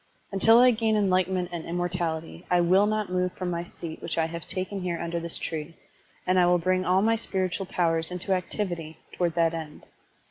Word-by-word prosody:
Until 225 +4 +5
I 250 +1 +7
gain 220 -1 +1
enlightenment 185 -3 +1
and 170 -2 -4
immortality, 170 -1 -3
I 180 - +4
will 185 +4 +4
not 215 -3 -1
move 180 0 0
from 180 -1 -3
my 170 0 -2
seat 170 -2 -8
which 165 - -4
I 165 - +3
have 165 0 -6
taken 190 +1 -3
here 175 -2 -2
under 170 0 -2
this 170 0 -4
tree, 160 0 -5 0.5
and 185 0 +3
I 175 - +5
will 175 0 +4
bring 185 +2 +1
all 185 +2 +3
my 225 +1 +3
spiritual 190 -3 -2
powers 165 -3 0
into 180 +2 -2
activity 175 -4 -3 0.2
toward 175 -2 0
that 165 -1 +2
end. 160 -2 -7
180 Hz, 200 wpm, -27 LUFS, 170-190 Hz, 0.5 s, I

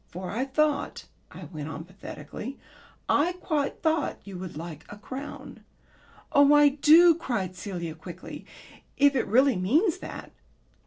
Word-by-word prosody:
For 180 +1 -6
I 245 +5 -1
thought," 295 +2 0 0.2
I - - -11
went 155 -1 -7
on 160 0 -6
pathetically, 190 - -8 0.5
"I 330 +5 +2
quite 310 -6 -2
thought 315 -3 +1
you 200 -2 -9
would 180 -5 -7
like 160 -1 -7
a 205 - -9
crown." 270 +7 -8 0.7
"Oh, 285 +1 +6
I 295 0 +7
do," 310 +5 +7
cried 225 - -3
Celia 175 -3 -5
quickly, 170 +3 -10 0.5
"if 285 0 +5
it 250 - 0
really 260 +1 +4
means 315 - +2
that." - - -8
255 Hz, 145 wpm, -27 LUFS, 180-295 Hz, 0.7 s, I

